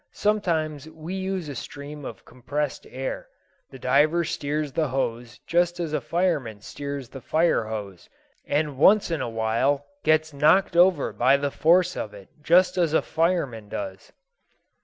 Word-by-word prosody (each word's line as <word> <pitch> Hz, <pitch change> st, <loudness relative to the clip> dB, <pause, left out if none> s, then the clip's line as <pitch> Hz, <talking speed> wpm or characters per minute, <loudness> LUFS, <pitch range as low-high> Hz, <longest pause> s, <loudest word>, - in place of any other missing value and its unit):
Sometimes 160 Hz, -8 st, -1 dB
we 160 Hz, +3 st, -8 dB
use 190 Hz, -3 st, -3 dB
a 145 Hz, -, -5 dB
stream 145 Hz, +2 st, -8 dB
of -, -, -9 dB
compressed 140 Hz, +3 st, -4 dB
air. 130 Hz, +1 st, -5 dB, 0.4 s
The 135 Hz, -, -11 dB
diver 145 Hz, +7 st, +3 dB
steers 150 Hz, -1 st, -2 dB
the 155 Hz, +3 st, 0 dB
hose 120 Hz, -2 st, -3 dB
just 175 Hz, +1 st, +1 dB
as 165 Hz, -3 st, -3 dB
a 150 Hz, -, 0 dB
fireman 145 Hz, -, -1 dB
steers 140 Hz, 0 st, -6 dB
the 135 Hz, -, -10 dB
fire 160 Hz, -3 st, +2 dB
hose, 105 Hz, -5 st, -7 dB, 0.4 s
and 145 Hz, -2 st, -1 dB
once 200 Hz, +3 st, +5 dB
in 160 Hz, -4 st, -1 dB
a 120 Hz, -, -2 dB
while 115 Hz, +6 st, 0 dB, 0.2 s
gets 155 Hz, 0 st, +2 dB
knocked 155 Hz, +6 st, +3 dB
over 175 Hz, -4 st, +4 dB
by 130 Hz, +3 st, +4 dB
the 140 Hz, 0 st, -2 dB
force 180 Hz, +4 st, +3 dB
of 105 Hz, -1 st, -5 dB
it, 100 Hz, -2 st, -13 dB
just 180 Hz, +4 st, +4 dB
as 165 Hz, -3 st, +2 dB
a -, -, +3 dB
fireman 160 Hz, -, -1 dB
does." 290 Hz, -, -6 dB
150 Hz, 160 wpm, -25 LUFS, 130-170 Hz, 0.4 s, once